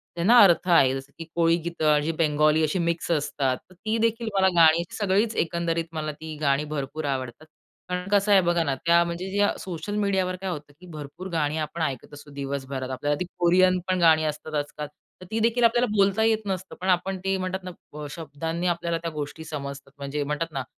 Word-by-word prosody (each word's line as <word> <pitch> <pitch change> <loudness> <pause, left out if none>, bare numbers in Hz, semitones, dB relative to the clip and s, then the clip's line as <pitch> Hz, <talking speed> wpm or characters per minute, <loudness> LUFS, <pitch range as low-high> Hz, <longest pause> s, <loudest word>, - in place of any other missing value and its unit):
त्यांना 190 +8 +5
अर्थ 185 -1 +4
आहे. 140 -7 +5
जसं 135 +1 -8
की 165 - -6
कोळी 165 -1 +4
गीत 170 -1 -5
आणि 150 +1 +3
बंगाली 155 0 +3
अशी 155 +4 0
मिक्स 170 0 -1
असतात. 140 -4 0
तर - - -17
ती 215 +5 -2
देखील 230 0 0
मला 190 -1 +4
गाणी 165 0 +6 0.2
सगळीच 205 +2 +1
एकंदरीत 170 0 -2
मला 155 -1 -3
ती 155 +1 -8
गाणी 140 0 +2
भरपूर 145 +2 -4
आवडतात. 135 +1 -4 0.4
कारण 180 +1 -3
कसं 205 0 +3
आहे 195 - +7
बघा 175 -1 +1
ना, 140 -4 0
त्या 170 0 +5
म्हणजे 190 +4 0
सोशल 185 +3 -5
मीडियावर 190 -3 0
काय 190 +1 -5
होतं 150 -4 -6
की 180 - -14
भरपूर 150 +5 -8
गाणी 155 -1 0
आपण 160 +2 -4
ऐकत 140 -1 -3
असतो 145 0 -12
दिवसभरात. 135 -1 -4
आपल्याला 145 +3 -1
ती 180 - -1
कोरियन 185 +1 +4
पण 185 -1 +1
गाणी 160 -2 +5
असतात 155 +1 -11
आज-काल. 145 0 -3 0.3
तर - - -9
ती 225 - 0
देखील 230 +2 +2
आपल्याला 240 +2 +4
बोलता 200 +2 +3
येत 220 -1 +3
नसतं. 190 -1 -4
पण 190 - -1
आपण 185 +1 +1
ते 195 0 +1
म्हणतात 185 0 -3
ना, 150 -4 -9
शब्दांनी 165 +2 -4
आपल्याला 170 -1 0
त्या 165 - -3
गोष्टी 150 +1 -6
समजतात. 140 -2 -7
म्हणजे 140 +1 -3
म्हणतात 150 +3 -3
ना, 135 -2 -2
165 Hz, 200 wpm, -25 LUFS, 150-185 Hz, 0.4 s, आहे